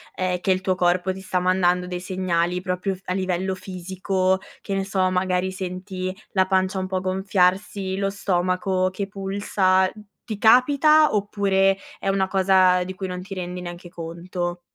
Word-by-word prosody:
ehm, 180 -1 -1
che 190 - +1
il 185 0 +1
tuo 185 0 0
corpo 180 +1 +1
ti 190 - -7
sta 185 -1 -1
mandando 180 0 +2
dei 180 -1 -4
segnali 180 -1 -1
proprio 185 +1 -2
f 185 - -18
a 185 - -2
livello 190 0 -1
fisico? 185 0 -1 0.2
Che 200 - -4
ne 195 0 -1
so, 190 -1 +1
magari 185 0 0
senti 185 0 -5 0.2
la 190 -2 +3
pancia 190 0 +1
un 185 - -3
po' 185 -1 -2
gonfiarsi? 190 0 0
Lo 195 0 0
stomaco 185 -1 0
che 195 +1 -4
pulsa? 195 -1 +1
Mh, 215 - -13 0.2
ti 215 -3 -5
capita 285 +7 +5
oppure 195 -1 +2 0.2
è - - -5
una 195 -1 +2
cosa 185 -1 +4
di 185 +1 -6
cui 190 0 -5
non 180 0 -5
ti 195 +1 -8
rendi 180 -1 -5
neanche 175 0 -8
conto? 175 +1 -5
185 Hz, 175 wpm, -23 LUFS, 180-195 Hz, 0.2 s, capita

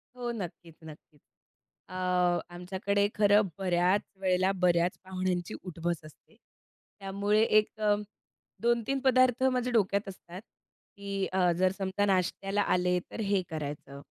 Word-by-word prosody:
हो, 245 -1 -3
नक्कीच, 175 -6 -7
नक्कीच. 155 -1 -14 0.7
अ, - - -10 0.6
आमच्याकडे 195 +3 0
खरं 205 0 +5 0.2
बऱ्याच 185 +1 +2 0.2
वेळेला, 185 0 +2
बऱ्याच 175 0 +2
पाहुण्यांची, 185 -2 -2
उठ-बस 170 -2 -3
असते. 155 - -17 0.6
त्यामुळे 200 +2 +1 0.2
एक 215 - -3 0.9
2-3 235 +3 +1
पदार्थ 255 -1 +3
माझ्या 250 -1 +1
डोक्यात 200 -2 +1
असतात 185 -1 -10 0.6
की 200 -1 -3
अ, 180 -2 +3
जर 185 +1 +3
समजा 195 +1 0
नाश्त्याला 195 +1 0
आले, 180 -2 +1
तर - - -7
हे 200 -2 +1
करायचं 145 -3 -6
190 Hz, 120 wpm, -29 LUFS, 180-205 Hz, 0.9 s, खरं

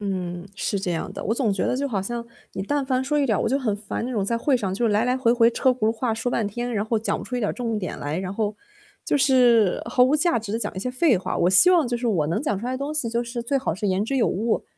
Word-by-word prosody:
嗯， 180 -3 -4
是 205 - -1
这 190 -2 -3
样 165 - -3
的， - - -6
我 225 - 0
总 235 -5 +1
觉 195 - -1
得 - - 0
就 280 +2 -1
好 205 -7 -2
像 235 +3 -4 0.3
你 190 - -4
但 285 +7 -1
凡 260 -1 0
说 295 +3 0
一 285 - +2
点 220 -7 +1
儿 - - -1
我 - - 0
就 265 - +1
很 230 -7 -1
烦， 205 +2 -5
那 250 - -4
种 215 -6 -1
在 230 +4 0
会 260 +3 +2
上 195 -6 -2
就 230 +3 +1
来 210 +2 +2
来 250 +1 +1
回 240 -3 +2
回 235 -1 +5
车 260 +2 +2
轱 255 - -2
辘 - - +2
话 230 +1 -2
说 230 +2 -2
半 225 -3 0
天， 240 +4 -4
然 210 -1 0
后 220 0 0
讲 220 - -1
不 - - -7
出 250 - -4
一 - - -2
点 210 - 0
重 230 -3 -2
点 185 -4 -5
来， 145 +3 -3
然 190 0 -4
后 210 -1 -2 0.5
就 - - +1
是 245 -7 +4
毫 250 +2 +2
无 265 +4 +4
价 305 -2 +2
值 215 -2 -7
地 225 - 0
讲 - - -3
一 - - -5
些 250 - -2
废 255 0 +3
话。 185 - -3
我 175 - +3
希 270 - +7
望 340 -6 +4
就 240 0 -1
是 240 0 -2
我 170 -9 +1
能 165 - -1
讲 210 -10 -1
出 230 - -5
来 255 - -2
的 255 - -3
东 280 +2 -3
西 300 -6 -1
就 235 +1 -1
是 240 0 -5
最 255 +4 0
好 270 - -1
是 190 +5 -3
言 190 +1 +1
之 270 +5 -2
有 245 - +3
物， 220 +5 -1
230 Hz, 350 characters per minute, -23 LUFS, 205-255 Hz, 0.5 s, 希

